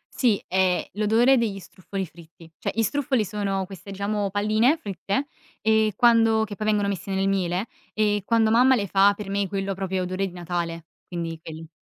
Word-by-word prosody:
Sì, 230 -6 +2
è 185 -1 +1
l'odore 225 +6 +4
degli 215 -4 -1
struffoli 190 +1 -6
fritti. 165 0 -16
Cioè - - -2
gli 225 - +2
struffoli, 265 -1 0
sono 195 -1 -2
queste 195 +1 -10
diciamo 200 +1 -1
palline 215 - +2
fritte, 200 - -3 0.3
e 220 -1 +2
quando 225 -2 +4
che 205 -1 -5
poi 215 +1 -4
vengono 210 -1 +2
messe 195 -1 -4
nel 195 0 +1
miele, 190 0 0 0.3
e 210 -1 +1
quando 225 +1 +2
mamma 255 +3 +5
le 210 -5 -1
fa 195 +1 +4
per 205 -1 -7
me, 200 0 0
quello 195 +1 -2
proprio 190 0 -3
è - - 0
odore 185 +2 -2
di 180 - -10
Natale, 170 -2 -4 0.2
quindi 165 -2 -5
quelli. 160 0 -9
200 Hz, 190 wpm, -24 LUFS, 185-220 Hz, 0.3 s, mamma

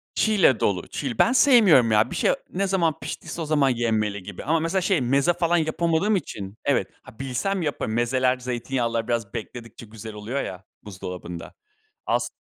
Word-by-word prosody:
Çiğ 220 - +2
ile 135 - +4
dolu, 95 -3 0
çiğ. 130 -6 -4
Ben 235 - +5
sevmiyorum 215 - +6
ya. 105 0 +3
Bir - - -4
şey - - +2 0.2
ne 195 +1 0
zaman 170 -5 +1
piştiyse 170 - -6
o - - -2
zaman 145 -3 +2
yenmeli 110 -4 -1
gibi. 100 0 -8
Ama 160 +3 +1
mesela 165 +4 0
şey, 185 -5 +1
meze 140 +7 +2
falan 175 0 +1
yapamadığım 165 +5 +1
için 100 - -5
Evet. 130 -9 +2 0.2
Ha, 110 - -15
bilsem 135 +9 -2
yaparım. 145 -8 -2
Mezeler, 125 +2 +1
zeytinyağlılar 120 -2 -2
biraz 115 -4 -2
bekledikçe 115 0 -8
güzel 110 0 -9
oluyor 110 +7 -3
ya 95 0 -7 0.2
buzdolabında. 90 -4 -8 0.5
As - - 0
130 Hz, 175 wpm, -24 LUFS, 110-165 Hz, 0.5 s, sevmiyorum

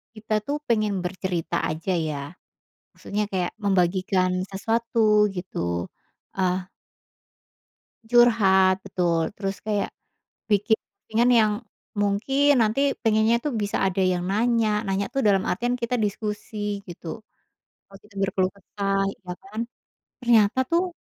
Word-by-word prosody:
kita 215 0 -1
tuh 285 +6 -2
pengen 215 -5 0
bercerita 180 -3 -2
aja 160 +4 -2
ya, 155 -5 -2 0.7
maksudnya 210 0 -3
kayak 180 -2 -1
membagikan 185 -1 +1
sesuatu 215 0 +2
gitu, 85 - -3 0.5
eee 185 -1 -1 1.4
Curhat 200 -6 +5
betul, 170 -3 0
terus 195 -1 -4
kayak, 210 -2 -2 0.6
bikin 205 +2 +3
posting-an 230 +2 -1
yang 220 -3 +5 0.4
mungkin 255 +8 +2
nanti 235 +5 +2
pengennya 220 +1 +3
itu 295 +5 -3
bisa 205 -2 -1
ada 190 0 0
yang 180 -1 +1
nanya, 215 +1 +1
nanya 195 -1 -1
tuh 270 - +1
dalam 200 -4 +3
artian 240 +6 -1
kita 235 0 -2
diskusi 210 -1 -3
gitu, 170 +5 -8 0.7
waktu 195 +1 -15
itu 205 - -22
berkeluh 195 -1 +1
kesah 195 0 -1
ya 180 -2 -10
kan, 240 -4 -8 0.6
ternyata 230 -2 +4
tuh, 345 +1 +1
205 Hz, 120 wpm, -24 LUFS, 185-225 Hz, 1.4 s, Curhat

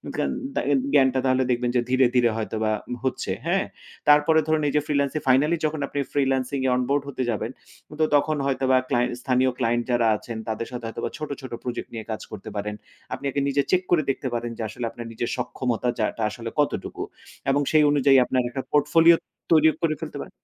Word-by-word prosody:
জ্ঞান - - 0 0.2
দাগেন 140 -1 +2
জ্ঞানটা 130 -2 +4
তাহলে 130 0 +3
দেখবেন 120 0 0
যে 125 - +4
ধীরে, 130 0 +4
ধীরে 120 -1 +5
হয়তোবা 110 0 -1 0.3
হচ্ছে। 130 -7 -2
হ্যাঁ? 185 +3 +1 0.4
তারপরে 150 +2 +6
ধরুন 155 0 +2
এই 145 - -1
যে 150 - +4
ফ্রিল্যান্সিং 140 0 0
ফাইনালি 145 +6 +4
যখন 155 0 -1
আপনি 145 - -4
ফ্রিল্যান্সিং 135 -1 0
এ - - +3
অন 125 - +1
বোর্ড 140 0 +2
হতে 130 -2 -3
যাবেন। 115 +1 -2 0.5
তো 155 - +4
তখন 150 +1 +2
হয়তোবা 130 -1 +2
ক্লায়েন্ট 125 -2 +1
স্থানীয় 130 0 +2
ক্লায়েন্ট 120 -1 +1
যারা 120 -1 +3
আছেন 115 +2 -7
তাদের 110 +1 -3
সাথে 120 -2 -6
হয়তোবা 115 - -4
ছোট, 150 0 -5
ছোট 130 - -8
প্রজেক্ট 125 -1 -4
নিয়ে 110 -2 -6
কাজ 110 - -4
করতে 105 - -8
পারেন। 105 +1 -3 0.4
আপনি - - -6
আগে 140 - -1
নিজে 140 +1 +2
চেক 185 - +4
করে 165 -3 +4
দেখতে 135 0 -1
পারেন 120 0 -2
যে - - -5
আসলে 120 +2 -5
আপনার 120 - -8
নিজের 115 +1 -3
সক্ষমতার 125 -1 -1
জায়গাটা 110 +1 -1
আসলে 115 0 -6
কতটুকু? 145 - -1 0.5
এবং 140 +1 +3
সেই 155 -1 +5
অনুযায়ী 140 -1 +5
আপনার 130 0 +1
একটা 135 +2 -4
পোর্টফোলিও 160 +3 +6 0.4
তৈরিও 155 -1 +6
করে 160 -2 +1
ফেলতে 155 -3 -6
পারেন - - -8
130 Hz, 200 wpm, -24 LUFS, 120-145 Hz, 0.5 s, তারপরে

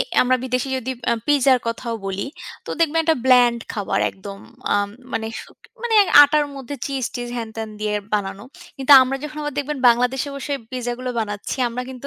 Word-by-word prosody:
এ - - +4 0.2
আমরা 255 +1 +2
বিদেশী 255 +1 -1
যদি 260 +1 -3 0.3
পিজ্জার 275 -3 +4
কথাও 230 0 -3
বলি, 195 +5 -3 0.4
তো - - -6
দেখবেন 325 0 +3
একটা 320 0 +3
ব্ল্যান্ড 245 -2 +5
খাবার 205 -3 -1
একদম। 195 +1 -10 0.4
আম 205 0 +1 0.2
মানে 220 - -2 0.2
সু - - -16 0.3
মানে 475 -2 0 0.3
আটার 295 +1 +3
মধ্যে 270 +1 -7
চিজ-টিজ 250 -3 -4
হ্যান-ত্যান 225 -1 -5
দিয়ে 210 0 -1 0.2
বানানো। 195 -1 -3 0.3
কিন্তু 275 0 +3
আমরা 265 +1 -1
যখন 300 0 -7
আবার 295 -1 -3
দেখবেন 290 0 -3
বাংলাদেশে 250 +4 +1
বসে 285 +1 -3 0.2
পিজ্জা 245 -2 -3
গুলো 255 0 -4
বানাচ্ছি। 205 +2 -4
আমরা 245 +2 -4
কিন্তু 260 +2 -8
250 Hz, 175 wpm, -21 LUFS, 225-275 Hz, 0.4 s, ব্ল্যান্ড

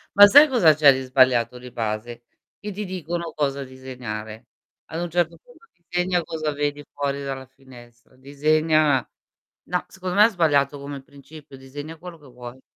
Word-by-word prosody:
Ma 205 0 +10
sai 290 +9 +8
cosa 190 - +4
c'è 145 -2 +6
di 130 - -3
sbagliato 130 -2 +2
di 125 0 -11
base, 115 +1 -5 0.4
che 210 0 -6
ti 205 +2 -5
dicono 170 -2 -5
cosa 140 -2 -1
disegnare. 125 -4 -8 0.4
Ad 165 +2 -5
un 175 - -3
certo 170 0 -1
punto: - - -22 0.2
disegna 180 0 0
cosa 155 -2 -3
vedi 145 0 -3
fuori 140 0 -3
dalla 135 -1 -5
finestra, 125 -2 -18
disegna 150 0 +1 0.6
no 180 +1 -3
secondo 185 -1 -6
me 210 +1 +7
è - - +3
sbagliato 145 - +1
come 140 -1 -7
principio, 140 0 -15
disegna 145 +5 -9
quello 175 0 -11
che 145 -3 -18
vuoi. 125 +1 -11
145 Hz, 165 wpm, -23 LUFS, 130-170 Hz, 0.6 s, Ma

